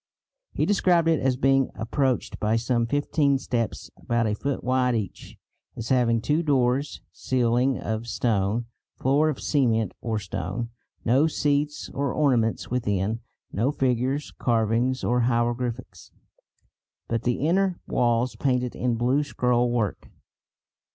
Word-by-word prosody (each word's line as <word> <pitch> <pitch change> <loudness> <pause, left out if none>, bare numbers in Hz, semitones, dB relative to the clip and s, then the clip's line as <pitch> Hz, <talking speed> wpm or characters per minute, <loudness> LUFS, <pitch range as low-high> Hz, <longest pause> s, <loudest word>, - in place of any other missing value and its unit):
He - - 0
described 180 -4 +3
it 165 -2 +3
as 130 -1 +1
being 135 0 +3
approached 130 +3 -1
by 110 +1 +1
some 120 0 0
fifteen 145 +1 +1
steps, 120 -4 -3
about 120 0 -1
a 105 - 0
foot 140 +5 -3
wide 125 -1 +2
each; 105 -4 -5 0.4
as 115 - -6
having 120 -3 +3
two 150 +7 +1
doors, 135 -2 +1
ceiling 125 +1 +1
of 110 +1 -4
stone, 110 -1 0 0.3
floor 145 +4 +2
of 145 - -3
cement 115 - +1
or 115 -2 -2
stone; 100 +4 -4 0.3
no 130 +7 +4
seats 150 -1 0
or 140 -1 -1
ornaments 120 -9 +1
within, 105 -3 0 0.3
no 120 +7 +1
figures, 130 +1 0
carvings 120 +2 +1
or 125 0 +2
hieroglyphics, 120 0 -1 1.0
but 115 -1 -1
the 125 +4 -1
inner 185 +1 +1
walls 120 +1 +1
painted 125 -3 0
in 125 -1 0
blue 125 +5 +2
scrollwork. 120 -5 0
125 Hz, 130 wpm, -25 LUFS, 115-135 Hz, 1.0 s, no